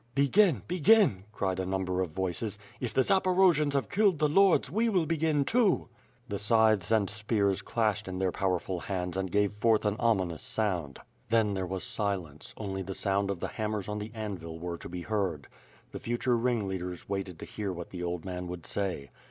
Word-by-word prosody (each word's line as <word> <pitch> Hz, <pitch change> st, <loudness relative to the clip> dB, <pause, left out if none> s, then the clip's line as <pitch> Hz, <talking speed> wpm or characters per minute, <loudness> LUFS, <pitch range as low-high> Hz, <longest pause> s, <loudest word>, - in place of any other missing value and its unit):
"Begin! 140 Hz, -, +4 dB
begin!" 180 Hz, -, +4 dB
cried 95 Hz, -3 st, -2 dB
a -, -, 0 dB
number 95 Hz, -1 st, -1 dB
of 90 Hz, -, -1 dB
voices, 95 Hz, +5 st, -3 dB, 0.2 s
"if 125 Hz, -4 st, -3 dB
the 130 Hz, -, +3 dB
Zaporo 185 Hz, 0 st, +4 dB
jians 150 Hz, -1 st, 0 dB
have 140 Hz, -, 0 dB
killed 200 Hz, -3 st, +3 dB
the 150 Hz, -, +3 dB
lords, 190 Hz, 0 st, +4 dB
we 225 Hz, +5 st, +2 dB
will 185 Hz, -6 st, +2 dB
begin 155 Hz, -3 st, +1 dB
too." 220 Hz, -, +2 dB, 0.4 s
The 100 Hz, -4 st, -3 dB
scythes 110 Hz, -2 st, +3 dB
and 110 Hz, -3 st, +3 dB
spears 105 Hz, -2 st, 0 dB
clashed 110 Hz, -2 st, 0 dB
in 95 Hz, 0 st, -4 dB
their 95 Hz, -1 st, +1 dB
powerful 90 Hz, -1 st, -1 dB
hands 90 Hz, -1 st, -3 dB
and 95 Hz, -1 st, -2 dB
gave 105 Hz, +1 st, +2 dB
forth 110 Hz, +1 st, +2 dB
an 105 Hz, 0 st, +1 dB
ominous 95 Hz, -9 st, +1 dB
sound. 90 Hz, -10 st, -1 dB, 0.3 s
Then 110 Hz, -2 st, +3 dB
there 95 Hz, -1 st, -2 dB
was 95 Hz, 0 st, -4 dB
silence, 100 Hz, -, -4 dB
only 95 Hz, -3 st, -4 dB
the 95 Hz, 0 st, -5 dB
sound 100 Hz, 0 st, 0 dB
of 100 Hz, -3 st, -2 dB
the. -, -, -1 dB
hammers 105 Hz, -2 st, -3 dB
on 105 Hz, 0 st, -3 dB
the 105 Hz, +1 st, -5 dB
anvil 95 Hz, -7 st, -5 dB
were 85 Hz, 0 st, -5 dB
to -, -, -8 dB
be 90 Hz, 0 st, -5 dB
heard. 95 Hz, -9 st, -1 dB, 0.5 s
The -, -, -6 dB
future 120 Hz, +1 st, 0 dB
ringleaders 95 Hz, -7 st, -2 dB
waited 95 Hz, -3 st, -3 dB
to -, -, -8 dB
hear 105 Hz, -3 st, -4 dB
what 85 Hz, -1 st, -7 dB
the 90 Hz, -, -6 dB
old 85 Hz, -1 st, -3 dB
man 90 Hz, -1 st, -4 dB
would 90 Hz, -1 st, -7 dB
say. 90 Hz, -10 st, -3 dB
100 Hz, 195 wpm, -29 LUFS, 90-120 Hz, 0.5 s, Begin